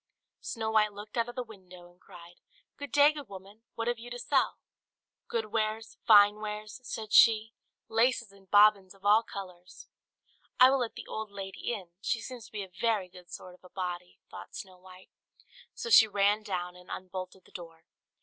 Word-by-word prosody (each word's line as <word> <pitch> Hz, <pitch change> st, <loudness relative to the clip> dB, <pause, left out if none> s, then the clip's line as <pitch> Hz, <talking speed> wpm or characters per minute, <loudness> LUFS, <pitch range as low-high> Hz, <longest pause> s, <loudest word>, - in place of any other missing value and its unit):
Snow 220 Hz, -2 st, -4 dB
White 215 Hz, -1 st, +3 dB
looked 205 Hz, +1 st, -10 dB
out 235 Hz, 0 st, 0 dB
of 240 Hz, -, -9 dB
the 250 Hz, -, -3 dB
window, 185 Hz, -5 st, -14 dB
and 175 Hz, -, -29 dB
cried, 175 Hz, 0 st, -14 dB, 0.4 s
"Good 285 Hz, 0 st, -8 dB
day, 290 Hz, +1 st, +6 dB
good 295 Hz, -4 st, -9 dB
woman; 195 Hz, +3 st, -12 dB
what 230 Hz, 0 st, -3 dB
have 240 Hz, -1 st, -1 dB
you 240 Hz, +1 st, -10 dB
to 245 Hz, -, -6 dB
sell?" 245 Hz, -, +1 dB, 0.7 s
"Good 465 Hz, -1 st, -3 dB
wares, 220 Hz, 0 st, -2 dB
fine 205 Hz, -1 st, +7 dB
wares," 215 Hz, +3 st, -6 dB
said 220 Hz, -3 st, -6 dB
she; 225 Hz, -1 st, +6 dB, 0.3 s
"laces 230 Hz, -1 st, +1 dB
and 195 Hz, -1 st, -21 dB
bobbins 205 Hz, -2 st, +5 dB
of 195 Hz, 0 st, -20 dB
all 210 Hz, +2 st, +6 dB
colours." 185 Hz, -4 st, -10 dB, 0.7 s
"I 255 Hz, +1 st, +8 dB
will 275 Hz, -, +2 dB
let 240 Hz, -2 st, -3 dB
the -, -, -8 dB
old 220 Hz, -1 st, -5 dB
lady 195 Hz, +2 st, -6 dB
in; 190 Hz, -7 st, -6 dB
she 230 Hz, -, -1 dB
seems 245 Hz, -1 st, -9 dB
to -, -, -22 dB
be 210 Hz, -2 st, -4 dB
a -, -, -9 dB
very 215 Hz, -6 st, +1 dB
good 180 Hz, -1 st, -15 dB
sort 180 Hz, -, -9 dB
of 180 Hz, -, -21 dB
a 180 Hz, -, -15 dB
body," 180 Hz, -1 st, -5 dB
thought -, -, -10 dB
Snow 185 Hz, -2 st, -9 dB
White; 185 Hz, 0 st, -16 dB, 0.6 s
so 465 Hz, -, -5 dB
she 225 Hz, -, +9 dB
ran 205 Hz, +1 st, +2 dB
down, 180 Hz, -4 st, -4 dB
and 180 Hz, +1 st, -16 dB
unbolted 185 Hz, 0 st, -7 dB
the -, -, -21 dB
door. 165 Hz, -2 st, -11 dB
210 Hz, 195 wpm, -30 LUFS, 185-225 Hz, 0.7 s, she